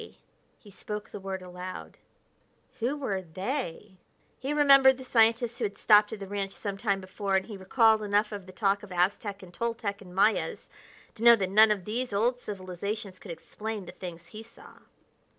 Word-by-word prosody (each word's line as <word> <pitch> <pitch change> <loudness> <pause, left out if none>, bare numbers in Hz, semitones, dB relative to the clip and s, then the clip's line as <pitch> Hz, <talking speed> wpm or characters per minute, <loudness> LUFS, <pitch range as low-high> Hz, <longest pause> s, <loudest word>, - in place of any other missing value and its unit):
He 205 - -17
spoke 210 +2 -7
the - - -7
word 190 -1 -5
aloud. 180 +1 -8 0.8
Who 250 +6 -1
were 205 -9 -2
"they?" 190 - -5 0.4
He 270 +2 -3
remembered 275 -3 +6
the 260 - -9
scientist 230 -1 +2
who - - 0
had 200 - -5
stopped 210 -1 +5
at 220 - -6
the 200 - -6
ranch 195 0 -4
some 200 -2 -5
time 200 -1 0
before, 195 +1 -3
and 190 - +1
he 215 - -8
recalled 220 +3 +3
enough 210 +1 +1
of 200 -3 -7
the - - -10
talk 200 +1 +1
of 210 - -12
Aztec 195 +3 -1
and 180 -1 -13
Toltec 225 -1 -3
and 180 -2 -13
Mayas 205 +3 +1 0.4
to - - -14
know 235 0 +9
that 190 -4 -2
none 215 +2 +7
of 200 -4 -1
these 240 +2 -3
old 240 +5 +1
civilizations 195 -1 -6
could 200 - -12
explain 210 +4 -6
the - - -9
things 170 -2 -9
he 215 - -9
saw. 410 - -16
205 Hz, 185 wpm, -28 LUFS, 190-225 Hz, 0.8 s, know